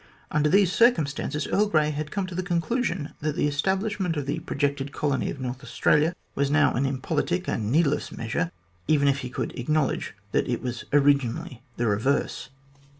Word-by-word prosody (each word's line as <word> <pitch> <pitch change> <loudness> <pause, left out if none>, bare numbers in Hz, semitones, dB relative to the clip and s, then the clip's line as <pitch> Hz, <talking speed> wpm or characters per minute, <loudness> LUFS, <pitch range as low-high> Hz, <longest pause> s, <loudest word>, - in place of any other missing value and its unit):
Under 150 0 +2
these 195 +1 +4
circumstances, 155 - +2
Earl 210 +1 +2
Grey 155 -5 +2
had 150 0 -4
come 200 +3 -2
to 185 - -8
the 180 - -1
conclusion 180 - -1
that 150 -1 -2
the - - +1
establishment 190 +3 0
of 145 - -2
the 140 - -2
projected 140 -1 -2
colony 145 -2 -1
of 140 - -5
North 130 +1 -5
Australia 150 +6 +2 0.2
was 140 0 0
now 145 -1 +4
an 135 +2 +1
impolitic 155 +7 -1
and 110 -1 -1
needless 150 0 +2
measure, 120 +10 -2 0.4
even 145 -2 +3
if 140 0 +2
he 125 - -5
could - - -3
acknowledge 145 -3 0 0.2
that - - +1
it 120 - -1
was 120 -2 -4
originally 140 0 +2 0.2
the 120 - 0
reverse. 115 +8 0
145 Hz, 175 wpm, -26 LUFS, 135-170 Hz, 0.4 s, these